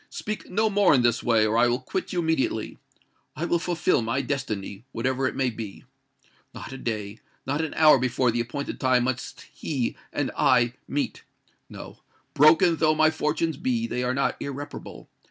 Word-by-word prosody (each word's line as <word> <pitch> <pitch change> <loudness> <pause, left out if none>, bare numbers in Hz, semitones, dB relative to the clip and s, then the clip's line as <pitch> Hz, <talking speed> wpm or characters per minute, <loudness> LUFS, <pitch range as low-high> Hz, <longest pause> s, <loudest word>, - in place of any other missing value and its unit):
Speak 215 0 -6
no 220 +4 +1
more 205 -7 +4
in 125 - +3
this 120 -1 +2
way—or 110 -2 +2
I 120 +1 +5
will 120 +1 +1
quit 190 - -4
you 180 - -4
immediately. 160 -9 -1 0.6
I 170 - -3
will 170 0 +1
fulfil 170 -4 +1
my 115 +4 -1
destiny—whatever 125 +1 -3
it - - -4
may 130 -2 0
be. 110 -3 -8 0.7
Not - - -8
a 135 - -8
day—not 110 +6 -4
an 160 - -4
hour 155 -4 +6
before 125 0 +1
the 120 - -2
appointed 125 +5 -5
time 130 -2 +3
must 130 0 -3
he 135 -6 -3 0.2
and - - -2
I 120 -1 +3
meet! 145 - -2 0.5
No—broken 165 +3 +1
though 155 -1 +3
my 155 0 +4
fortunes 155 0 -1
be, 120 -4 -1
they 120 +1 -3
are 125 +1 -1
not 140 - 0
irreparable. 140 +1 -7
130 Hz, 165 wpm, -25 LUFS, 120-155 Hz, 0.7 s, hour